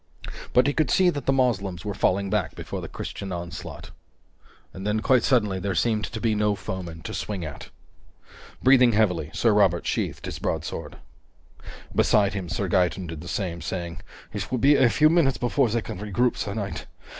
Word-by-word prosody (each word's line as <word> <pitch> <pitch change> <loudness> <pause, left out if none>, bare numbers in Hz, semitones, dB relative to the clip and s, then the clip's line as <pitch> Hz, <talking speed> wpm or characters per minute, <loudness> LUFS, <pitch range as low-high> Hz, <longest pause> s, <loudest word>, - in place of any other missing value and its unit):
But 125 - +5
he 145 - +2
could 155 -4 +1
see 185 -1 +4
that 145 -5 -6
the - - +5
Moslems 105 -9 0
were 105 - -2
falling 100 +1 +1
back 100 -7 0
before - - -6
the - - -6
Christian 95 -1 -6
onslaught. 85 -1 -7 0.8
And 95 - -8
then, 105 +1 +1
quite 130 0 +4
suddenly, 105 -7 +2
there 95 0 -2
seemed 105 +6 +1
to 110 - -6
be 110 -1 +1
no 105 -1 +1
foeman 90 -4 -6
to - - -6
swing 95 -5 -4
at. 75 -3 -8 0.9
Breathing 125 -2 +6
heavily, 90 -8 +1
Sir 115 +5 +2
Robert 95 -5 +3
sheathed - - -2
his - - -5
broadsword. - - -4 1.0
Beside 105 -1 +3
him, 95 -4 -4
Sir 95 +3 -2
Gaeton 90 +1 +1
did 80 -2 -7
the 85 - -9
same, 85 -3 -3
saying: 85 -3 -4 0.3
"It 100 -2 -4
will 130 - 0
be 140 +5 +5
a 130 -3 +5
few 150 +6 +4
minutes 155 -5 +3
before 125 +1 +1
they 115 0 -1
can - - -6
regroup, 105 +4 +1
sir 100 -1 -4
knight. 100 -3 -4
105 Hz, 190 wpm, -25 LUFS, 90-120 Hz, 1.0 s, Breathing